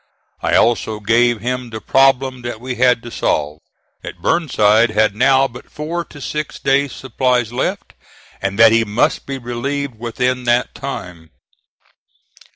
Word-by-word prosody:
I - - +1
also 110 -2 +2
gave 115 +1 +2
him 125 +1 -3
the 110 -1 -6
problem 135 0 +2
that 120 -2 -6
we 125 +2 -5
had 125 -1 +2
to 120 - -9
solve 75 -6 -1 0.4
that - - -9
Burnside 115 -8 +3
had 110 -1 +1
now 135 +3 +4
but 125 -1 -13
four 165 +3 -4
to 145 - -14
six 150 +2 -4
days 140 0 +1
supplies 125 -2 -1
left, 125 - -3 0.5
and 100 0 -2
that 115 0 +7
he 115 0 +4
must 105 +1 0
be 135 -1 -4
relieved 130 +1 -4
within 125 +2 -2
that 120 +1 +1
time. 90 - -7
120 Hz, 150 wpm, -18 LUFS, 110-135 Hz, 0.5 s, that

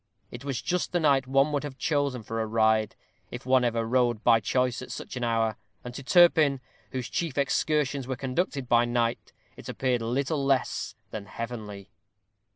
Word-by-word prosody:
It - - -9
was 140 -3 -3
just 180 0 -1
the 175 - +2
night 140 -5 +3
one 135 +3 +3
would 145 -1 -1
have 140 -3 -7
chosen 140 -4 -1
for 115 +1 -3
a 110 - -2
ride, 110 -1 +2 0.3
if 120 +1 -8
one 130 -1 +4
ever 115 -1 0
rode 120 -2 +1
by 115 -2 +5
choice 125 +4 0
at 130 - -9
such - - -7
an 125 - -3
hour; 115 -2 0 0.3
and 125 - -7
to 130 - -7
Turpin, 155 -2 +5 0.3
whose 130 -2 -3
chief 165 -6 -3
excursions 140 -1 0
were 130 - -2
conducted 135 +1 -2
by 120 0 +4
night, 120 -1 -1 0.2
it - - -10
appeared 125 -3 0
little 135 +5 -1
less 135 -1 0 0.2
than 105 -2 -6
heavenly. 105 -4 -7
125 Hz, 180 wpm, -27 LUFS, 115-140 Hz, 0.3 s, by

